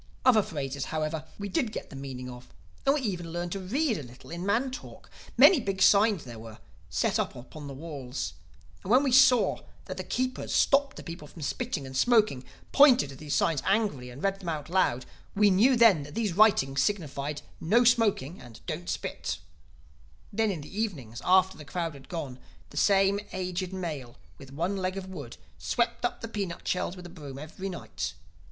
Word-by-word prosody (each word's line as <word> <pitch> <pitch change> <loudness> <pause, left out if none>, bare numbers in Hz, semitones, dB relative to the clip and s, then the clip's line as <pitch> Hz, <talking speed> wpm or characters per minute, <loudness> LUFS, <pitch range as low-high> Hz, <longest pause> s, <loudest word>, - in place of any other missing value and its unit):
Other 240 -4 +7
phrases, 140 -6 -4
however, 155 0 -2
we 205 - -4
did 215 +4 0
get - - -7
the - - -9
meaning 130 -2 -6
of; 125 0 -10 0.4
and 275 - +5
we 300 - -1
even 175 -8 -3
learned 175 +1 -3
to 195 - -3
read 230 - 0
a - - -5
little 125 +2 -13
in 170 +1 -5
man 230 +7 +1
talk. 260 - -10 0.3
Many 370 - +8
big 195 -5 -3
signs 200 -2 +5
there 120 -3 -9
were, 110 -1 -10 0.3
set - - +1
up - - -1
upon 145 +4 -9
the 140 - -7
walls; 140 -4 -5 0.5
and - - -7
when 255 +5 +6
we 270 - +1
saw 255 -3 +5 0.3
that 185 -1 -6
the 185 - -3
keepers 255 +6 -2
stopped 275 -1 +3
the - - -8
people 165 -3 -8
from 160 +1 -10
spitting 225 - -2
and 130 0 -8
smoking, 215 - +3 0.3
pointed 260 - +6
to - - -10
these 150 +1 -3
signs 155 -5 +2
angrily 195 - 0
and 125 +4 -10
read 195 0 0
them 180 -3 -5
out 155 -1 -4
loud, 155 -9 +2 0.3
we 205 0 +5
knew 230 +8 +5
then 225 -9 +6
that 145 +4 -9
these 215 -5 0
writings 160 -11 +4
signified, 150 -7 -2 0.2
No 225 +9 +4
Smoking 210 - +2
and 120 -2 -12
Don't 90 +2 -4
Spit. 90 - -3 1.0
"Then 220 +1 +2
in 175 -6 -3
the 195 +9 -5
evenings, 130 - -4
after 190 0 +4
the - - -8
crowd 165 +2 -3
had 135 -1 -14
gone, 145 -8 -5 0.3
the - - -13
same 195 +4 +4
aged 185 0 -3
male 155 -10 -5 0.2
with 135 -2 -12
one 170 +8 -1
leg 185 0 -2
of 195 - -5
wood, 145 -10 -8 0.2
swept 235 0 -1
up 245 - -1
the 230 - -4
peanut 200 -6 -4
shells 180 0 -1
with 180 -1 -10
a - - -8
broom 145 -6 -9
every 160 +7 -6
night. 180 - -5
180 Hz, 200 wpm, -28 LUFS, 140-210 Hz, 1.0 s, Many